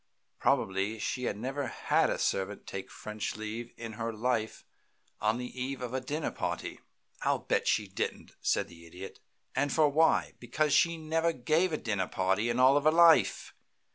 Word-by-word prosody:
Probably 95 +3 +1
she 110 +4 -2
never 130 +6 -3
had - - +1
a - - -1
servant 100 +1 -1
take 95 0 -6
French 105 0 -5
leave 110 +2 -5
in 115 -1 -6
her 115 0 -1
life 110 0 -2 0.6
on 110 +2 +2
the 125 - -4 0.2
eve 135 +1 -3
of 125 0 -5
a 130 - -1
dinner 150 +4 -3
party." - - -4 0.4
"I'll - - +2
bet - - -1
she - - +2
didn't," - - -4
said - - +1
the 85 -1 -14
Idiot. 90 +3 -10 0.4
"And 145 0 +1
for 155 -2 +4
why? 160 +3 +3
Because 145 +5 0
she 170 0 +4
never 160 +1 0
gave 160 +7 +1
a 155 - 0
dinner 100 -8 -1
party 95 +5 0
in 120 +1 0
all 135 +3 +6
her 155 - +5
life. 165 - +5
120 Hz, 170 wpm, -30 LUFS, 105-145 Hz, 0.6 s, all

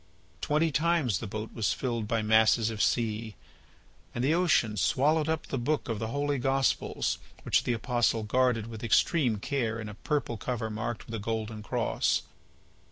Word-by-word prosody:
Twenty 155 +2 +1
times 150 - +1
the 115 - -5
boat 110 +2 -6
was 110 -3 0
filled 115 -4 -2
by 115 -1 0
masses 110 +1 +4
of 110 - -3
sea. 110 -2 0 0.8
And 120 - -1
the 145 +4 +3
ocean 165 -11 +2
swallowed 150 +8 +2
up 160 0 -1
the 135 - -3
book 150 +5 -1
of 110 -2 -2
the 110 - -2
Holy 145 +3 -1
Gospels 135 +1 0 0.2
which - - +2
the 120 - +1
apostle 115 -1 +1
guarded 125 0 +1
with 110 -1 -8
extreme 120 +1 +2
care 115 0 -2
in 110 - -5
a 105 - -7
purple 140 0 -2
cover 110 0 -3
marked 110 +1 -4
with 115 - -10
a 115 - -2
golden 110 0 -3
cross. 105 - 0
115 Hz, 170 wpm, -29 LUFS, 110-135 Hz, 0.8 s, masses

